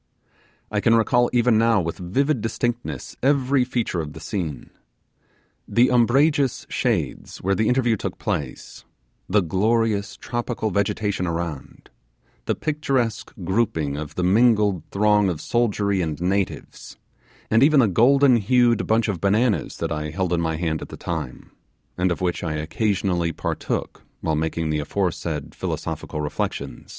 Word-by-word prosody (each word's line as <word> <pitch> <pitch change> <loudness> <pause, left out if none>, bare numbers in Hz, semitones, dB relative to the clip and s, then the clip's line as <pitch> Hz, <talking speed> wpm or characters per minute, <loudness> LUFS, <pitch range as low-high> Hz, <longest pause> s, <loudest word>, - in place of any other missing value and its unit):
I 105 - +1
can 115 +1 +4
recall 120 +2 +3
even 120 -2 +3
now 115 -1 +4
with 85 +1 -3
vivid 130 +9 0
distinctness 115 - -3
every 135 -1 +3
feature 120 -8 -1
of 75 -1 -7
the - - -9
scene. 85 -9 -5 1.0
The 120 +2 +3
umbrageous 135 +3 +3
shades - - -1
where 100 +2 +2
the 110 +2 +1
interview 125 -2 +2
took - - -5
place 70 -3 -4 0.5
the 100 +1 +3
glorious 105 +4 0
tropical 120 -2 -3
vegetation 100 -1 -1
around 85 -7 -5 0.5
the - - 0
picturesque 135 -7 -1
grouping 95 -7 0
of 75 +1 -6
the 90 - -1
mingled 105 -1 +3
throng 105 -1 +3
of 85 -4 -3
soldiery 105 -4 0
and 80 -3 -3
natives 95 +2 -3 0.5
and 110 +1 +4
even 145 +1 +6
the 120 - +5
golden 125 +6 +5
hued 120 +1 +2
bunch 110 +1 +2
of 95 -6 -3
bananas 105 +3 +1
that - - -3
I 75 0 -2
held 90 +2 -1
in 85 - +1
my 80 -1 -1
hand 80 -2 -2
at - - -8
the - - -9
time, 80 -7 -5 0.4
and 90 0 +1
of 85 - -3
which 90 -1 -1
I 80 -3 -2
occasionally 90 +1 -1
partook - - -3 0.2
while 80 -1 0
making 80 +1 -1
the 75 - 0
aforesaid 80 -2 -2
philosophical 75 - -4
reflections. 75 -4 -4
100 Hz, 145 wpm, -23 LUFS, 85-120 Hz, 1.0 s, even